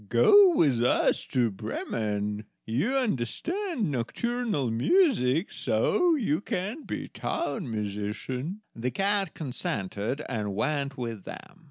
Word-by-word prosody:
"Go 365 Hz, -, +7 dB
with 135 Hz, -, +3 dB
us 125 Hz, -, +2 dB
to 120 Hz, -4 st, +1 dB
Bremen. 105 Hz, 0 st, -3 dB, 0.2 s
You 135 Hz, -, 0 dB
understand 255 Hz, -, -1 dB
nocturnal 150 Hz, -, -1 dB
music, 165 Hz, -, +3 dB
so 355 Hz, -3 st, +2 dB
you 200 Hz, -, 0 dB
can 210 Hz, -, -3 dB
be -, -, -4 dB
town 225 Hz, -, -3 dB
musician." 110 Hz, -, -4 dB
The 120 Hz, +2 st, -2 dB
cat 195 Hz, +2 st, 0 dB
consented, 120 Hz, -, -3 dB
and 105 Hz, -5 st, -3 dB
went 140 Hz, +3 st, -1 dB
with 115 Hz, -5 st, -5 dB
them. 185 Hz, -2 st, -10 dB
140 Hz, 115 wpm, -28 LUFS, -, 0.2 s, Go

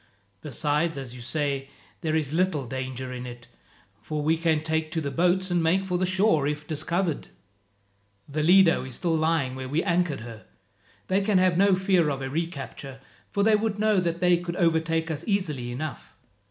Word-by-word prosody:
Besides, 150 Hz, +3 st, 0 dB
as 130 Hz, -3 st, -6 dB
you 125 Hz, -, -10 dB
say, 140 Hz, +1 st, -2 dB, 0.3 s
there 160 Hz, -3 st, 0 dB
is 150 Hz, -2 st, -1 dB
little 170 Hz, -5 st, +1 dB
danger 130 Hz, 0 st, -5 dB
in 125 Hz, 0 st, -6 dB
it, 120 Hz, 0 st, -10 dB, 0.5 s
for 150 Hz, +7 st, -3 dB
we 160 Hz, +2 st, +3 dB
can 160 Hz, -2 st, +1 dB
take 160 Hz, 0 st, 0 dB
to 165 Hz, -, 0 dB
the 145 Hz, -3 st, -3 dB
boats 180 Hz, +3 st, +1 dB
and 175 Hz, -1 st, +2 dB
make 180 Hz, +4 st, +2 dB
for 180 Hz, -2 st, -1 dB
the 185 Hz, -, +1 dB
shore 190 Hz, -6 st, +2 dB
if 150 Hz, 0 st, -3 dB
discovered. 165 Hz, +2 st, -2 dB, 1.0 s
"The 150 Hz, +2 st, -2 dB
Lido 175 Hz, 0 st, +5 dB
is 130 Hz, -2 st, -8 dB
still 170 Hz, -2 st, 0 dB
lying 160 Hz, -5 st, +1 dB
where 130 Hz, 0 st, -6 dB
we 150 Hz, +5 st, 0 dB
anchored 170 Hz, -, 0 dB
her. 115 Hz, -1 st, -10 dB, 0.6 s
They 190 Hz, +2 st, +1 dB
can 200 Hz, -1 st, +2 dB
have 185 Hz, -1 st, +3 dB
no 195 Hz, +1 st, +5 dB
fear 185 Hz, -4 st, +2 dB
of 135 Hz, -1 st, -3 dB
a 135 Hz, -, -4 dB
recapture, 140 Hz, -4 st, -5 dB, 0.3 s
for 200 Hz, -, 0 dB
they 220 Hz, 0 st, +5 dB
would 210 Hz, -1 st, -1 dB
know 215 Hz, -1 st, +3 dB
that 170 Hz, -1 st, -2 dB
they 180 Hz, -1 st, +5 dB
could 175 Hz, 0 st, -5 dB
overtake 165 Hz, -2 st, +1 dB
us 155 Hz, +1 st, -4 dB
easily 150 Hz, -, -1 dB
enough. 140 Hz, +1 st, -6 dB
160 Hz, 190 wpm, -26 LUFS, 140-180 Hz, 1.0 s, Lido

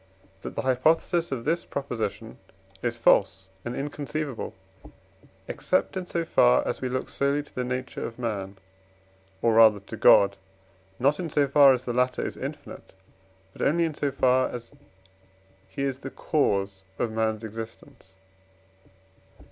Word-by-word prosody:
that -, -, -7 dB
the -, -, -2 dB
hypothesis 160 Hz, +6 st, +2 dB
of 120 Hz, -4 st, -4 dB
this 165 Hz, +3 st, 0 dB
Proposition 125 Hz, -7 st, -5 dB, 0.4 s
is 120 Hz, -1 st, -1 dB
false 95 Hz, -4 st, +3 dB
and 120 Hz, -, -4 dB
inconceivable, 145 Hz, -1 st, -4 dB, 0.9 s
except -, -, -1 dB
in 185 Hz, -1 st, -4 dB
so 170 Hz, -1 st, -2 dB
far 60 Hz, -, +4 dB
as -, -, -3 dB
we 130 Hz, -, -2 dB
look 130 Hz, +1 st, -2 dB
solely 140 Hz, +1 st, 0 dB
to -, -, -20 dB
the 125 Hz, -, -2 dB
nature 125 Hz, +1 st, -4 dB
of 115 Hz, -, -6 dB
man, 100 Hz, -5 st, -4 dB, 0.9 s
or 115 Hz, -, +4 dB
rather 110 Hz, -2 st, +6 dB
to 100 Hz, -, -9 dB
God; 100 Hz, 0 st, +5 dB, 0.6 s
not 140 Hz, +4 st, +2 dB
in 175 Hz, -3 st, -3 dB
so 145 Hz, -1 st, +2 dB
far 140 Hz, 0 st, +7 dB
as 125 Hz, -, -7 dB
the 120 Hz, -, -2 dB
latter 125 Hz, +1 st, +1 dB
is -, -, -4 dB
infinite, -, -, -8 dB, 0.6 s
but -, -, -10 dB
only 170 Hz, +5 st, +2 dB
in 160 Hz, -, -2 dB
so 145 Hz, -1 st, -1 dB
far 130 Hz, -1 st, +2 dB
as 115 Hz, -1 st, -8 dB, 1.0 s
he 95 Hz, +9 st, -4 dB
is 135 Hz, -1 st, -2 dB
the 135 Hz, -, -7 dB
cause 100 Hz, -11 st, 0 dB, 0.2 s
of 115 Hz, -, -1 dB
man's 110 Hz, 0 st, -1 dB
existence. 115 Hz, +3 st, -9 dB
125 Hz, 150 wpm, -26 LUFS, 110-140 Hz, 1.0 s, far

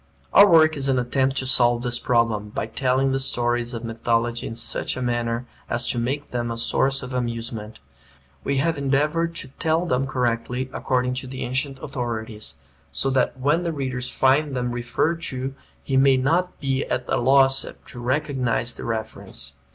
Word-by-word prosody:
Our 200 Hz, -, +9 dB
work 155 Hz, -2 st, +6 dB
is 140 Hz, -1 st, -1 dB
an 130 Hz, -, +3 dB
attempt 130 Hz, +2 st, +1 dB
to 130 Hz, -, 0 dB
solve 120 Hz, -2 st, +4 dB
this 120 Hz, -1 st, -1 dB
problem, 115 Hz, -4 st, +1 dB
by 105 Hz, -, -3 dB
telling 130 Hz, +4 st, +1 dB
the 135 Hz, -, +1 dB
stories 120 Hz, -2 st, 0 dB
of 115 Hz, -, -5 dB
mythology 115 Hz, +1 st, -1 dB
in 115 Hz, -, -6 dB
such 115 Hz, -, -1 dB
a -, -, -3 dB
manner 120 Hz, 0 st, -1 dB, 0.2 s
as 120 Hz, 0 st, 0 dB
to 120 Hz, -, -2 dB
make 135 Hz, +5 st, -2 dB
them 120 Hz, -1 st, -2 dB
a 115 Hz, -, -3 dB
source 135 Hz, +3 st, +1 dB
of 125 Hz, +1 st, -7 dB
amusement. 115 Hz, -3 st, -3 dB, 0.7 s
We 140 Hz, -, 0 dB
have 160 Hz, +2 st, +1 dB
endeavored 150 Hz, +5 st, +1 dB
to 130 Hz, -, -6 dB
tell 160 Hz, +2 st, +2 dB
them 135 Hz, -3 st, 0 dB
correctly, 125 Hz, 0 st, -1 dB
according 125 Hz, -1 st, 0 dB
to 130 Hz, -, -9 dB
the 130 Hz, 0 st, -5 dB
ancient 135 Hz, +2 st, -2 dB
authorities, 115 Hz, -, -4 dB, 0.4 s
so 135 Hz, -, 0 dB
that 130 Hz, 0 st, +1 dB
when 145 Hz, +6 st, +2 dB
the 170 Hz, -1 st, -1 dB
reader 130 Hz, -3 st, -3 dB
finds 135 Hz, +3 st, +2 dB
them 125 Hz, -1 st, -1 dB
referred 125 Hz, +7 st, -1 dB
to 130 Hz, +1 st, -3 dB, 0.3 s
he 135 Hz, -, 0 dB
may 135 Hz, 0 st, +5 dB
not 170 Hz, +8 st, +1 dB
be 135 Hz, -1 st, 0 dB
at 125 Hz, 0 st, -2 dB
a -, -, +1 dB
loss 135 Hz, +2 st, +4 dB, 0.2 s
to 125 Hz, -, -10 dB
recognize 125 Hz, -2 st, 0 dB
the -, -, -8 dB
reference. 110 Hz, -10 st, -4 dB
130 Hz, 180 wpm, -23 LUFS, 120-135 Hz, 0.7 s, Our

